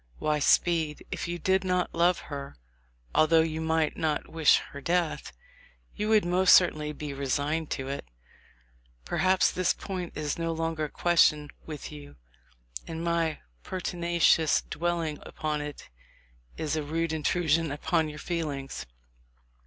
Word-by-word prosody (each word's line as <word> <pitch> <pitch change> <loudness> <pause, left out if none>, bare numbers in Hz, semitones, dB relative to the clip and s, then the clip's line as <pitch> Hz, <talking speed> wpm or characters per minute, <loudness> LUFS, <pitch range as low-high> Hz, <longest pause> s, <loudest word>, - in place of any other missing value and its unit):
Why, 150 -1 0
Speed, 160 0 +2
if - - -3
you 175 0 -3
did 190 +3 +1
not 180 -1 0
love 170 +1 +2
her, 140 - -7 0.6
although 160 +1 +5
you 160 0 -3
might 160 -1 +1
not 155 -2 -1
wish 160 -2 +4
her 140 - -8
death, 170 +1 -1 0.6
you 210 +1 -2
would 215 -4 +4
most 180 +1 +6
certainly 155 -4 +3
be 150 -1 -6
re 140 0 -4
signed 150 +4 -1
to 135 -1 -3
it. 140 - -5 1.0
Perhaps 185 - +2
this 185 -1 +1
point 185 -3 -5
is 150 +1 -3
no 165 0 -1
longer 165 -1 -2
a - - -6
ques 175 +2 +4
tion 150 -1 0 0.2
with 155 -2 -7
you, 145 -1 -11 0.7
and 165 0 -5
my 170 -2 0 0.2
pertinacious 170 -3 +2
dwelling 165 -2 -1
upon 155 -1 -3
it 145 -1 -7 0.7
is 155 -1 -1
a 155 - -1
rude 160 +2 -2
intrusion 160 0 +1
upon 155 +2 0
your 150 - -8
feelings. 145 - -4
160 Hz, 145 wpm, -28 LUFS, 150-175 Hz, 1.0 s, most